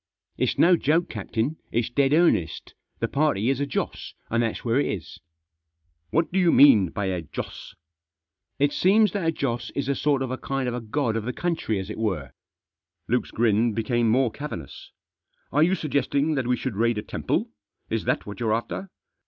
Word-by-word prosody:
"It's - - 0
no 175 +2 +6
joke, 165 +3 +1
captain; 115 +7 -2
it's 120 0 0
dead 135 +1 +2
earnest 150 - +2 0.2
The 115 - -1
party 135 -4 +1
is 135 - -2
a 140 - -1
Joss, 135 - -4 0.2
and 115 +1 +2
that's 115 +1 -2
where 120 +3 +2
it - - +1
is." 95 -5 -5 0.5
" 80 0 -49
What 165 +1 +1
do 190 - +1
you 175 -2 +4
mean 110 - +7
by 100 - -3
a 90 -2 -1
Joss? 80 - -8 0.3
" 80 0 -65
" - - -63
It 145 +1 +2
seems 205 +2 +4
that 185 -4 -2
a - - +4
Joss 120 -6 -3
is 140 -2 -2
a 140 - +2
sort 140 -1 +1
of 130 - -4
a 130 - -4
kind 135 -1 -2
of 120 - -1
a 125 - -3
god 115 +1 -1
of 110 -1 -2
the 125 - -1
country, 165 - -1
as 95 +2 -5
it 110 - -7
were." 90 - -2 0.8
Luke's - - 0
grin 115 0 +2
became 115 +1 +1
more 125 +1 +3
cavernous. 110 - -8 0.3
" - - -44
Are 145 - +2
you 180 +4 +4
suggesting 145 -1 0
that 135 -4 -1
we 125 0 +2
should 100 - -4
raid 115 0 +2
a 105 - -3
temple; - - -2 0.4
is - - -1
that - - 0
what 105 +2 -8
you're 110 -2 +1
after?" 185 +11 -4
120 Hz, 210 wpm, -25 LUFS, 105-145 Hz, 0.8 s, mean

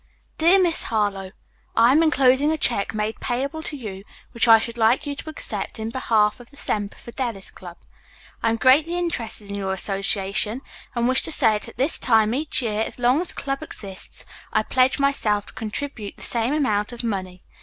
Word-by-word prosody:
"MY - - -36 0.3
DEAR 360 +4 +5
MISS 340 -2 0
HARLOWE: 205 -4 -1 0.4
"I 230 +2 +5
am 300 +4 +4
enclosing 275 -2 +3
a 315 - 0
check 220 -7 +1
made 215 +1 -2
payable 275 +6 -3
to 305 -2 -3
you, 200 -7 -7 0.3
which 235 -1 +1
I 225 -1 +9
should 230 +1 -5
like 235 +7 +3
you 290 - -3
to 290 - -7
accept 310 - -4
in 220 0 -4
behalf 220 -4 +1
of 245 - -14
the 280 - -18
Semper 205 -6 -3
Fidelis 235 -5 -5
Club. 175 -2 -11 0.6
I - - +2
am 225 - +1
greatly 295 +9 +3
interested 230 -12 -3
in 200 - -4
your 195 -1 -2
association 200 +4 0 0.3
and 235 0 +1
wish 260 +1 +4
to - - -1
say 240 -7 +5
that 210 - -4
at - - -13
this 270 +6 +4
time 220 -2 +3
each 285 -1 -1
year 215 -2 -1
as - - -4
long 250 +5 +2
as 360 - -3
the - - -5
club 275 0 -3
exists 195 -10 -6 0.3
I 215 - +2
pledge 255 +3 +2
myself 225 -8 +1
to - - -12
contribute 220 -1 -5
the - - -9
same 235 +1 +1
amount 215 -7 0
of 240 0 -7
money. 185 -5 -4
235 Hz, 205 wpm, -23 LUFS, 210-275 Hz, 0.6 s, I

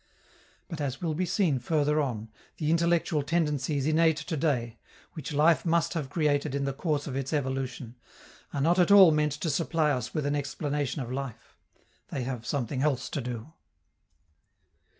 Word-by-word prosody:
But, 165 -5 -6
as 135 -2 -3
will 165 -3 -1
be 180 +4 -1
seen 165 -8 +1
further 150 +3 +1
on, 115 -6 -3 0.3
the 155 0 0
intellectual 170 -2 +2
tendencies 150 -3 0
innate 160 0 +3
to 160 +1 -4
day, 130 -7 -1 0.3
which 155 -1 -6
life 150 0 +4
must 170 -2 +1
have 150 -6 -3
created 145 -3 0
in 140 0 -1
the 140 - -1
course 145 0 -1
of 135 - -5
its 135 -1 -3
evolution, 130 -4 -3 0.6
are 140 - -2
not 170 +5 +3
at 180 - +4
all 195 -4 +9
meant 150 -1 +1
to 155 +3 -3
supply 160 0 +1
us 125 -5 -2
with 155 -3 -2
an 145 +1 0
explanation 145 -1 -2
of 120 - -7
life: 135 -2 -6 0.5
they 135 - -4
have 120 -2 -5
something 130 -2 -2
else 140 -3 0
to 140 - -2
do. 125 +4 -6
145 Hz, 170 wpm, -28 LUFS, 135-160 Hz, 0.6 s, all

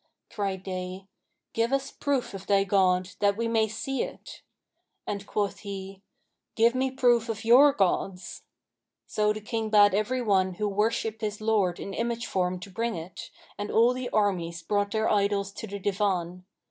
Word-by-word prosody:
Cried 195 -3 -3
they, 185 0 -5 0.5
'Give 230 +2 +1
us 275 0 -1
a - - -27
proof 275 -6 -1
of 195 0 -8
thy 200 -1 +4
god, 185 -2 +2
that 200 0 +2
we 230 0 -1
may 225 -1 +2
see 265 +5 -3
it;' - - -7 0.6
and 200 0 -4
quoth 205 -1 -2
he, 195 -1 -7 0.5
'Give 230 +1 +4
me 260 +1 0
proof 245 -3 +2
of 220 0 -4
your 265 +5 +7
gods.' 185 -4 -1 0.6
So 210 0 +1
the 215 0 -4
King 220 0 -3
bade 205 -2 +6
every 245 +5 0
one 190 -4 +2
who 210 +3 -1
worshipped 220 +2 -1
his 210 -1 -3
lord 210 -5 +1
in 195 - -6
image 235 +1 -2
form 180 -1 -1
to 195 - -9
bring 230 +2 -2
it, 170 +2 -8 0.3
and 205 - -3
all 235 +3 +4
the 255 -1 -4
armies 170 -5 0
brought 205 +3 0
their 220 +1 0
idols 200 -1 +1
to 220 - -7
the 200 0 -5
Divan. 185 -3 -1
205 Hz, 175 wpm, -27 LUFS, 190-225 Hz, 0.6 s, your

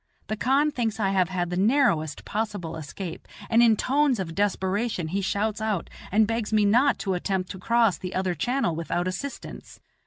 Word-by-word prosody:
The 215 - 0
khan 275 +7 +2
thinks 225 -5 -2
I 195 -3 +1
have 190 -2 +2
had 175 -2 -2
the 180 - -2
narrowest 195 - +2
possible 205 -6 -3
escape, 165 +3 -7 0.2
and 230 +1 +5
in 230 -2 +6
tones 275 -1 +2
of 170 -4 -4
desperation 200 -1 -1
he 195 +4 -1
shouts 205 +2 -1
out 215 -5 -2 0.2
and 215 +3 +4
begs 225 0 -2
me 215 -1 +3
not 245 +7 +4
to 190 - +1
attempt 185 0 -2
to 190 - -8
cross 230 -2 +2
the 180 0 -6
other 185 -1 0
channel 240 - 0
without 170 +2 -2
assistance. 275 +10 -6
205 Hz, 185 wpm, -26 LUFS, 180-230 Hz, 0.2 s, in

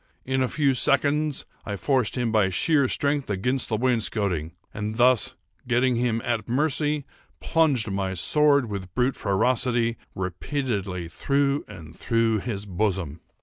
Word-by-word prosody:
In 130 0 0
a 130 - +2
few 140 -2 +2
seconds 150 +3 +1 0.2
I 100 - -4
forced 130 +2 0
him 120 -2 0
by 105 -3 +3
sheer 140 - +2
strength 140 0 -1
against 125 +7 0
the 110 - 0
wainscoting, 105 - 0 0.2
and 105 0 -4
thus, 125 0 +3 0.3
getting 125 0 +2
him 115 -1 0
at 115 -2 -2
mercy, 145 +2 +1 0.3
plunged 140 -10 +1
my 95 -1 -2
sword, 140 - +3
with 95 -4 -7
brute 130 +1 +1
ferocity, 115 +3 +1 0.2
repeatedly 95 - -3
through 140 - 0
and 80 -2 -11
through 115 -1 +1
his 100 -2 -4
bosom. 95 -5 -2
120 Hz, 140 wpm, -25 LUFS, 100-135 Hz, 0.3 s, by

